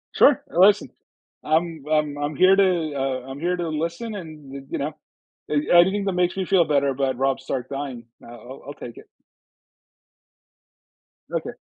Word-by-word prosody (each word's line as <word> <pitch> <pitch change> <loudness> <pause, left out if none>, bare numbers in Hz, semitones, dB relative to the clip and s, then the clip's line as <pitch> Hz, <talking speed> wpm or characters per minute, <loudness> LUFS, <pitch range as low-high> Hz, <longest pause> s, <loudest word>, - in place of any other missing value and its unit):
Sure, 280 - +5
uh, - - 0
listen, 195 - +5 0.5
I'm 160 -1 0
I'm 150 -2 +1
I'm 145 +1 -3
here 185 +5 +6
to 180 -5 +2
uh, 135 -2 -2
I'm 135 +2 -7
here 180 +2 0
to 170 -2 -3
listen 170 +8 -3
and, 155 -7 -9
eh, - - -5
you - - -3
know, 150 +3 -3 0.6
a - - -1 0.2
anything 195 +3 +4
that 195 - 0
makes 180 0 +1
me 190 - -1
feel 180 -3 +3
better 140 -2 +2
about 135 -1 -1
Rob 135 +1 0
Stark 130 -1 -4
dying, 135 -4 -5 0.2
I'll - - -12
I'll 120 +3 -12
I'll 145 - -6
take 120 -4 -10
it. - - -14 2.2
Okay. - - -3
155 Hz, 175 wpm, -23 LUFS, 135-180 Hz, 2.2 s, here